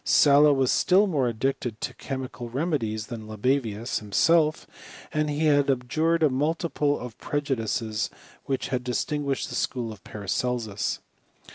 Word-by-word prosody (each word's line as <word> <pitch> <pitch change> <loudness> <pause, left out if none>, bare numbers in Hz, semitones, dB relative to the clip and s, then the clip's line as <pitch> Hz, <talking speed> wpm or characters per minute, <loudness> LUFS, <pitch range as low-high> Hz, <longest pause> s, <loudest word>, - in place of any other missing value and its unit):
Sala 145 +1 +6
was 135 -2 +2
still 190 +3 +4
more 145 -10 +1
addicted 120 -1 -2
to - - -3
chemical 130 -3 -6
remedies 120 -6 -1
than 115 -3 -7
Libavius 115 0 -1
himself; 155 +9 +2 0.5
but 155 0 +1
he 150 +2 0
had 145 -2 +4
abjured 155 +6 +1
a 155 - +5
multitude 150 +1 0
of 125 -2 -8
preju 145 -2 -1
dices 110 0 -2 0.4
which 135 -2 -2
had 125 -1 -1
distinguished 140 +2 -1
the - - -7
school 120 -3 -2
of 110 - -12
Paracelsus. 105 +1 -2
130 Hz, 140 wpm, -26 LUFS, 115-150 Hz, 0.5 s, Sala